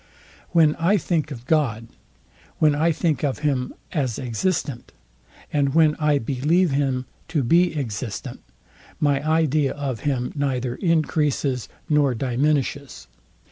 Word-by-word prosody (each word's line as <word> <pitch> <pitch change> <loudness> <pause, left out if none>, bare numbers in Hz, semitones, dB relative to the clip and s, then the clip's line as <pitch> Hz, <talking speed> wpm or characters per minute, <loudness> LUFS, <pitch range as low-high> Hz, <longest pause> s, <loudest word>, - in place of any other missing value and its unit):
When 160 -3 +4
I 180 +6 +3
think 160 -3 -1
of 125 -4 -8
God, 125 -7 0 0.7
when 155 -2 +4
I 160 +3 +2
think 155 -4 -1
of 140 -3 0
him 130 -4 0 0.2
as 135 - -1
existent, 130 - -2 0.6
and 140 -1 +1
when 155 -2 +5
I 150 -1 +3
believe 145 +8 +1
him 135 -2 0 0.2
to 155 -4 0
be 170 +5 +3
existent, 115 -5 -5 0.6
my 145 -1 +1
idea 155 -3 +2
of 135 -5 -4
him 130 -4 -2
neither 130 -4 -1
encreases 150 - 0 0.2
nor 145 -4 +2
diminishes. 140 - -1
145 Hz, 125 wpm, -23 LUFS, 130-155 Hz, 0.7 s, when